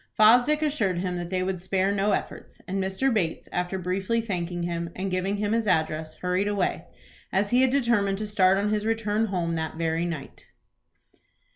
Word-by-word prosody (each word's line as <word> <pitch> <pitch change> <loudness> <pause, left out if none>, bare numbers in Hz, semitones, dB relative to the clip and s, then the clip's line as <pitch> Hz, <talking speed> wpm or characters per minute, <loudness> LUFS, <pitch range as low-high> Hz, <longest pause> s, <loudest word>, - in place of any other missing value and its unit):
Fosdick 245 +8 +5
assured 220 - 0
him 180 0 -2
that 175 0 -5
they 185 0 0
would 185 -1 -2
spare 190 +1 +1
no 200 +1 +1
efforts, - - -4
and 195 +1 -1
Mr. 195 +8 0
Bates, 175 -7 -1
after 180 +2 -2
briefly 190 +5 -1
thanking 175 -5 -3
him, 170 -1 -3
and 190 +1 -3
giving 185 +2 -1
him 205 0 -1
his 225 -1 +1
address, 155 -3 0
hurried 180 +2 -1
away, 205 -3 -1 0.5
as 200 +1 +1
he 250 +1 +4
had 260 - +4
determined 235 -7 +2
to 215 - -3
start 190 -2 +3
on 205 +1 0
his 210 -1 0
return 225 -1 0
home 175 -4 -1
that 160 -1 -3
very 165 +1 -1
night. 160 -5 -7
190 Hz, 185 wpm, -26 LUFS, 180-215 Hz, 0.5 s, Fosdick